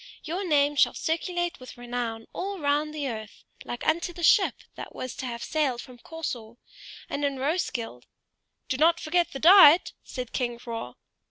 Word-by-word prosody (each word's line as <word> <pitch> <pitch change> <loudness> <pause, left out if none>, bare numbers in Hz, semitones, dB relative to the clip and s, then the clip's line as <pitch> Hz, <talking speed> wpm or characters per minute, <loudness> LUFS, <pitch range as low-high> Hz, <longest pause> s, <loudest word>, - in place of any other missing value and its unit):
Your 345 +5 -3
name 295 -4 +2
shall - - +3
circulate 350 +1 -2
with 255 -1 -11
renown 240 -2 -4
all 390 +2 -4
round 295 -1 0
the 300 -2 -3
earth, 220 -4 -7 0.2
like 240 - -6
unto 340 +2 +1
the 345 - -8
ship 385 +4 +5 0.2
that - - -9
was 255 -1 -6
to 260 - -4
have 235 -1 -5
sailed 285 -6 0
from 245 0 -11
Corsor; 240 -8 -6 0.5
and 290 - -4
in 280 -1 0
Roeskilde 260 - -3 0.3
" - - -53
"Do 260 - -1
not 330 +3 +4
forget 345 +2 0
the - - -5
diet!" 345 -1 +8
said 250 -2 -7
King 240 -2 -2
Hroar. 230 - -7
285 Hz, 175 wpm, -26 LUFS, 240-330 Hz, 0.5 s, diet